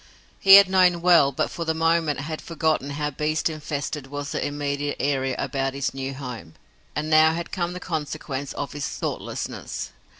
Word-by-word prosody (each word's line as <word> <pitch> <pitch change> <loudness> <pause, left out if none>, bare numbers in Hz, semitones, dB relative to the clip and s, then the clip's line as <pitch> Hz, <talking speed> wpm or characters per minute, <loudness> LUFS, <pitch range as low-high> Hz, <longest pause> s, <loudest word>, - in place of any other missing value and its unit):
He 195 0 +9
had 200 -1 +9
known 180 -2 +3
well, 170 -6 +6
but 130 - -1
for 170 - -4
the 160 -1 -1
moment 165 -3 +1
had 155 +2 -5
forgotten 160 -4 -1
how 150 +1 -2
beast 155 +3 -1
infested 150 -2 -4
was 145 +1 -5
the - - -2
immediate 145 0 -2
area 135 -2 0
about 135 0 -2
his 140 -1 -2
new 135 0 -4
home, 120 - -8 0.4
and 150 +1 -2
now 155 0 +5
had 170 0 -5
come 175 -1 -2
the 180 - -6
consequence 150 -5 -4
of 145 - -4
his 145 -1 -3
thoughtlessness. - - -5
150 Hz, 175 wpm, -24 LUFS, 140-160 Hz, 0.4 s, He